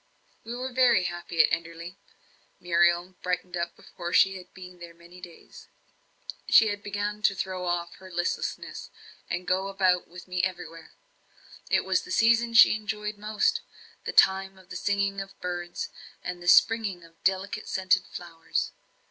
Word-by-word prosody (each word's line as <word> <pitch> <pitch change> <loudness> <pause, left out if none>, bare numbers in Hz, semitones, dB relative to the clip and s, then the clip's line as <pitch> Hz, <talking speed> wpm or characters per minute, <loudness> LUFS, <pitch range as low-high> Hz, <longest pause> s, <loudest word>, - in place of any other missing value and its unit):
We 230 +2 -6
were 255 +1 -5
very 245 -7 +4
happy 175 -1 +1
at - - +1
Enderley. 170 +2 -4 0.6
Muriel 175 +1 +2
brightened 180 0 -2
up 170 0 -3
before 175 0 -8
she 195 +1 +5
had 180 -1 -11
been 180 -1 -12
there 170 -1 -11
many 170 +2 -15
days. 175 -2 -13 0.8
She 220 -2 +6
began 205 +1 -4
to 200 -1 +3
throw 185 -1 -4
off 170 0 -2
her 190 0 -13
listlessness, 175 -1 -3 0.4
and 180 0 -3
go 190 +1 +1
about 185 -2 +1
with 180 +2 -12
me 180 0 -1
everywhere. 175 -3 -5 0.8
It - - +2
was - - +2
the 365 - -13
season 230 -6 +3
she 230 - +9
enjoyed 210 -1 -4
most 215 - +1 0.4
the - - -2
time 190 0 +4
of 190 -1 -19
the - - -8
singing 200 -1 0
of 195 0 -11
birds, 175 -1 -4 0.3
and 180 -1 -5
the 175 - -8
springing 205 -4 +4
of 165 0 -20
delicate 195 +2 -1
scented 185 0 +1
flowers. 165 -2 -4
185 Hz, 155 wpm, -27 LUFS, 175-205 Hz, 0.8 s, she